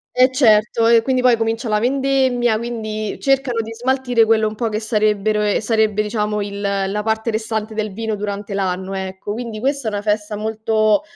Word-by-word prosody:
Eh 255 +1 +5
certo, 225 -3 +3
e 230 0 +6
quindi 255 +1 0
poi 250 -2 +5
comincia 225 +1 -2
la 210 0 +2
vendemmia, 260 -1 +1
quindi 215 -3 -4
cercano 270 -4 +1
di 225 0 -7
smaltire 250 -1 +1
quello 220 -1 +3
un 215 - -4
po' 225 +1 -2
che 215 0 -2
sarebbero 215 -1 +1
ehm, 210 -1 +1
sarebbe, 215 -1 +1
diciamo, 210 0 -2
il 200 0 -6
la 200 0 -1
parte 220 +1 -1
restante 220 0 -3
del 215 -1 -3
vino 220 +2 -3
durante 205 0 -5
l'anno, 190 0 -2
ecco, 190 +1 -5
quindi 230 -1 -5
questa 275 0 -1
è - - 0
una 205 0 -3
festa 210 0 -1
molto 220 +2 +1
220 Hz, 190 wpm, -19 LUFS, 210-235 Hz, -, e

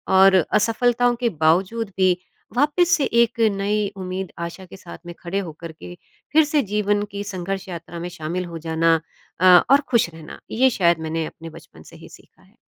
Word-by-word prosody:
और 190 0 +7 0.2
असफ़लताओं 240 +3 +2
के 240 -2 +1
बावज़ूद 185 +7 +1
भी 185 -1 +4 0.5
वापस 300 +5 +2
से 285 - -1 0.2
एक 235 0 0 0.2
नई 205 +1 0
उम्मीद, 185 -2 -5
आशा 170 +2 -6
के 185 - -13
साथ 175 -2 -11
में 175 - -7
खड़े 180 +3 -3
हो 180 -5 -5
कर 165 -1 -7
के 175 +2 -11 0.4
फिर 315 0 +6
से 295 -1 +1
जीवन 205 0 +1
की 200 0 -5
संघर्ष 195 0 -5
यात्रा 170 0 -8
में 175 +1 -5
शामिल 175 +3 -4
हो 170 -1 -7
जाना 165 0 +3 0.5
अ, - - +4 0.3
और 280 +1 +6
ख़ुश 235 -8 +2
रहना। 160 -1 -11
ये 260 +3 +3
शायद 170 -7 +2
मैंने 160 0 -2
अपने 165 0 -11
बचपन 165 +1 -15
से - - -14
ही - - -14
सीखा - - -19
है। - - -27
190 Hz, 195 wpm, -22 LUFS, 170-225 Hz, 0.5 s, और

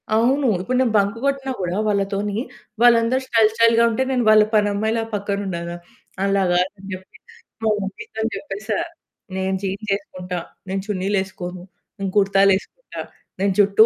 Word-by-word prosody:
అవును. 260 +5 +3
ఇప్పుడు 250 +6 -1
నేను 240 -4 +1
బంక్ 200 +2 +1
కొట్టినా 275 -1 0
కూడా 180 +1 -1
వాళ్ళతోని 200 0 0 0.4
వాళ్ళందరూ 240 +1 +5
స్టైల్ 225 -3 +4
స్టైల్‌గా 230 0 +5
ఉంటే, 230 +4 +1
నేను 250 -2 +1
వాళ్ళ 215 0 +8
పనమ్మాయిలా 215 +2 +1
పక్కన 200 0 -2
ఉండాల. 170 -2 -4 0.5
అలా 195 0 +2
గాదని 185 +2 -1
చెప్పి, 185 0 -10 0.5
మా 220 - +3
మమ్మీతోని 220 +3 -4
చెప్పేసా, 215 -4 -4 0.6
"నేను 190 0 -1
జీన్స్ 200 +2 -3
ఎసుకుంటా, 185 -3 -6 0.3
నేను 195 0 -1
చున్నీలేసుకోను, 190 -2 -2 0.4
నేను 195 -1 -2
కుర్తాలేసుకుంటా, 195 - +2 0.4
నేను 195 0 +2
జు‌ట్టూ 205 +2 +6
200 Hz, 135 wpm, -22 LUFS, 195-225 Hz, 0.6 s, వాళ్ళ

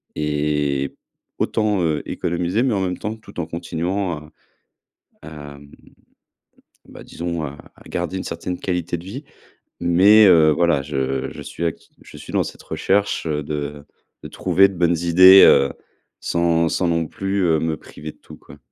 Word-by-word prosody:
et 75 -2 -1 0.4
autant, 105 -4 0
heu, 80 -2 0
économiser, 90 +6 -1
mais 130 -3 +1
en 100 - 0
même 90 -1 -2
temps 105 +2 -4
tout 110 -4 -12
en 85 - -2
continuant 85 +3 -3
à 75 +1 -13 0.9
à, 75 -2 -10
mmh, 70 0 -16 1.2
bah, - - -12
disons, 85 -1 -5
à 70 -1 -6 0.2
à - - -18
garder 95 - -3
une 95 - -3
certaine 85 +2 -5
qualité 90 -2 -2
de 85 - -11
vie. 130 +10 -8 0.6
Mais, 95 +5 +6
heu, 80 -4 +6
voilà, 85 -2 +2
je 65 -2 -3
je - - -10
suis 85 - -7
act 80 - -4 0.2
je - - -13
suis - - -11
dans - - +2
cette - - -9
recherche, 100 -1 -1
heu, 75 -2 -2
de 75 -1 -5 0.4
de - - -6
trouver 95 +1 +3
de - - -9
bonnes 85 -1 +2
idées, 95 +3 +7
heu, 70 0 +4 0.5
sans 85 -1 +1
sans 90 - 0
non 85 -1 0
plus, 95 +4 -3
heu, 80 -2 +2
me 80 -1 -2
priver 75 0 -10
de - - -29
tout, - - -14
quoi. 70 - -16
85 Hz, 175 wpm, -21 LUFS, 75-95 Hz, 1.2 s, idées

